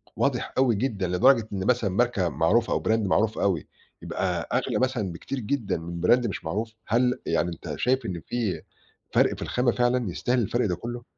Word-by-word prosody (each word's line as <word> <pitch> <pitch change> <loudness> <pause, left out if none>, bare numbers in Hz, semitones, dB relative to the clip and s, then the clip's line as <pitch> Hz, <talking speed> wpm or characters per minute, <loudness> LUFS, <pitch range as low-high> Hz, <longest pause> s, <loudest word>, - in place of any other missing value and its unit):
واضح - - 0
أوي 130 -4 +4
جدًا، 100 -5 -1
لدرجة 115 +5 +4
إن 95 -1 -2
مثلًا 120 -5 +2
ماركة 100 -3 +1
معروفة، 80 - +2
أو - - -1
Brand - - +1 0.2
معروف 110 +3 +2
أوي، 95 -6 0 0.3
يبقى - - -2
أغلى - - 0
مثلًا 125 -7 0
بكتير 130 +10 -5
جدًا 125 -1 -1
من 85 +1 -6
Brand 125 0 +4
مش 100 - -5
معروف، 110 +7 -3
هل 125 +2 +2
يعني 85 +1 +1
أنت 85 - -6
شايف 130 0 +1
إن 90 -5 -4
في 105 -10 -2 0.5
فرق - - +3
في - - -9
الخامة 125 -1 +1
فعلًا 120 -4 +1
يستاهل 125 +8 0
الفرق 120 +1 +1
ده 90 - 0
كُلُّه؟ 120 +5 -6
110 Hz, 190 wpm, -26 LUFS, 90-125 Hz, 0.5 s, أوي